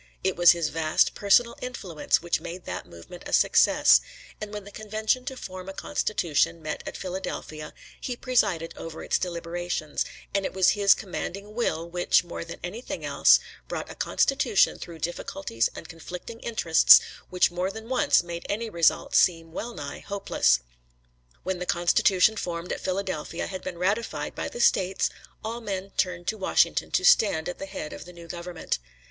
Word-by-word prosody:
It - - +1
was 175 0 +7
his 170 -3 -1
vast 160 -1 +2
personal 235 +4 +3
influence 185 -11 -1
which 170 - 0
made 175 +2 -8
that 90 - -5
movement 85 - -12
a - - -7
success, - - +5 0.4
and 210 -1 -5
when 210 -1 -6
the 205 - -12
convention 215 +4 -1
to 265 -2 -5
form 185 -4 -8
a - - -6
constitution 170 -5 0
met 155 -1 -5
at - - -5
Philadelphia, 175 -4 -5 0.3
he 250 - -3
presided 205 -10 0
over 165 -1 -8
its - - +1
deliberations, 170 -2 -3 0.3
and 200 0 +1
it - - -3
was 190 -1 +5
his 200 -1 +5
commanding 200 +1 -6
will 170 -8 -1
which, 175 0 +2
more 170 -1 -6
than 170 - -9
anything 215 +8 -5
else, - - +5 0.3
brought - - -5
a - - -7
constitution 245 -7 +2
through 170 -1 -8
difficulties 170 -7 -2
and - - -9
conflicting 180 +7 -9
interests 175 -10 +6 0.3
which 180 -1 +3
more 180 +2 -1
than 220 +3 -8
once 260 -4 +3
made 170 0 -6
any 220 +2 -2
result 170 -3 +2
seem 165 -2 +3
well 235 +8 -5
nigh - - -6
hopeless. 65 - +1 0.8
When 185 -1 -2
the 180 - -5
Constitution 185 +4 +3
formed 170 -2 -4
at - - -6
Philadelphia 185 -4 -3
had 185 -1 -6
been 180 -2 -5
ratified 200 +6 -1
by - - -4
the 480 - -5
States, 190 0 +2 0.3
all 230 +2 -4
men 195 -2 -4
turned 175 -1 -1
to 220 - -3
Washington 190 - +2
to - - +1
stand 200 - +4
at 180 - -5
the 195 - -6
head 155 -5 -6
of - - -9
the 180 - -12
new 170 -1 -12
government. 175 - -4
180 Hz, 175 wpm, -26 LUFS, 170-210 Hz, 0.8 s, was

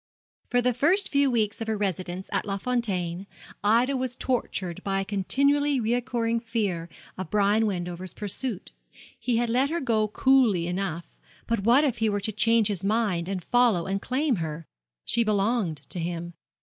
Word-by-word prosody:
For 245 0 +2
the 250 0 +2
first 340 - +3
few 280 -1 +3
weeks 220 -3 0
of 225 - -3
her 220 -1 -1
residence 185 -2 -3
at - - +1
Les 200 -1 -3
Fontaines, 195 -6 -2 0.4
Ida 235 +6 +3
was 255 -1 -2
tortured 195 -10 -2
by 195 -1 0
a - - -4
continually 280 +8 +1
recurring 235 0 0
fear 205 -8 -2 0.3
of 185 -4 -5
Brian 210 +2 +3
Wendover's 180 -2 -4
pursuit. 210 +1 -4 0.5
He 245 -2 0
had 240 +1 +1
let 255 +4 +2
her 340 +2 -1
go 225 -6 +1
coolly 225 -6 +3
enough; 175 -2 -4 0.3
but 230 0 0
what 235 +8 +4
if 260 -6 0
he 225 -1 +2
were 205 0 0
to 200 +2 -2
change 225 +1 +3
his 200 -3 -3
mind 200 -5 0
and 190 -3 -3
follow 235 -8 +3
and 195 +1 -2
claim 265 -1 0
her? 160 -1 -4 0.4
She 235 - +2
belonged 205 - 0
to 180 - -6
him. 170 0 -4
215 Hz, 175 wpm, -26 LUFS, 185-245 Hz, 0.5 s, what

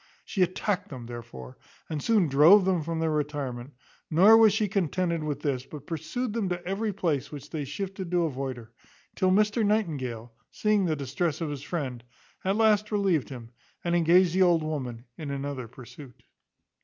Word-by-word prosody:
She 195 - -2
attacked 185 +2 0
them, 125 -4 -8
therefore, 85 - -9 0.3
and 155 -2 -4
soon 210 -3 +3
drove 160 +8 +6
them 185 -3 +1
from 165 +2 -3
their 160 -1 0
retirement; 145 -4 -3 0.4
nor 190 +8 +7
was 225 -1 +7
she 215 +1 +1
contented 180 -4 -1
with 145 -2 -3
this, 135 -4 -1
but 145 +1 -11
pursued 170 - -4
them 220 -5 -1
to 175 0 -4
every 205 +4 -1
place 165 -8 -2
which 145 -1 -9
they 150 -3 -3
shifted 190 +5 -5
to 175 -1 +2
avoid 135 -4 -3
her; 115 -1 -12 0.4
till 185 - +2
Mr 210 +3 +3
Nightingale, 135 - -1 0.2
seeing 210 -2 +1
the 160 -3 0
distress 145 +3 -2
of 160 -3 -3
his 140 -2 -5
friend, 140 -6 -4 0.4
at 195 +1 +1
last 215 -1 +3
relieved 195 -8 +1
him, 120 -4 -9 0.3
and 170 - -1
engaged 175 +1 +4
the 190 - +2
old 175 -3 +4
woman 130 -6 -4
in 150 -3 -5
another 140 -3 -4
pursuit. 125 +2 -13
160 Hz, 180 wpm, -27 LUFS, 140-190 Hz, 0.4 s, nor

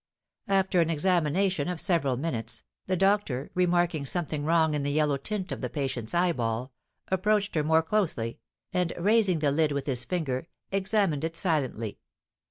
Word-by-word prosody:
After 190 -2 +3
an 165 - +1
examination 175 0 +1
of 180 -2 -2
several 145 -10 +1
minutes, 115 -6 -4 0.2
the 185 0 +1
doctor, 195 -9 +1
remarking 175 -3 +2
something 155 -1 -2
wrong 160 0 +3
in 150 - 0
the 140 - -1
yellow 150 -1 +2
tint 190 +5 -4
of - - -4
the - - -2
patient's 130 -4 -3
eyeball, 130 -8 0 0.4
approached 205 +2 +1
her 155 - +1
more 160 +1 +3
closely, 160 - -1 0.3
and, 180 -2 0
raising 200 -1 +3
the 150 -2 +1
lid 155 +1 +2
with 140 -1 -2
his 130 -4 -1
finger, 160 -5 -2 0.2
examined 195 -6 +1
it 165 0 -3
silently. 130 - -1
160 Hz, 160 wpm, -28 LUFS, 140-185 Hz, 0.4 s, After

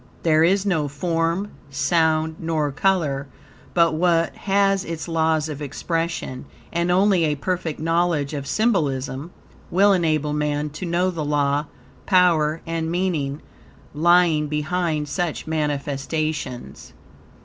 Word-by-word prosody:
There 160 -1 +4
is 195 +4 +3
no 160 -7 +1
form, 165 +6 -1 0.2
sound, 160 +2 +1
nor 155 -3 -1
color 145 -4 0 0.5
but 170 -2 +4
what 165 0 +2
has 195 -1 +1
its 165 -2 -5
laws 160 -2 +1
of 150 -2 -6
expression; 165 -2 -3 0.3
and 170 +1 0
only 185 0 +3
a 150 -1 0
perfect 175 +1 -3
knowledge 165 -2 0
of 140 -2 -4
symbolism 145 - 0 0.4
will 200 +3 +4
enable 155 -4 +1
man 150 0 -1
to 160 +5 -6
know 175 +2 +1
the 165 -3 -4
law, 145 0 +1 0.4
power, 165 -4 +3
and 165 -1 -2
meaning, 165 -5 -1 0.5
lying 165 -1 +3
behind 155 0 -1
such 170 +2 -2
manifestations. 150 -2 -3
160 Hz, 120 wpm, -22 LUFS, 150-175 Hz, 0.5 s, There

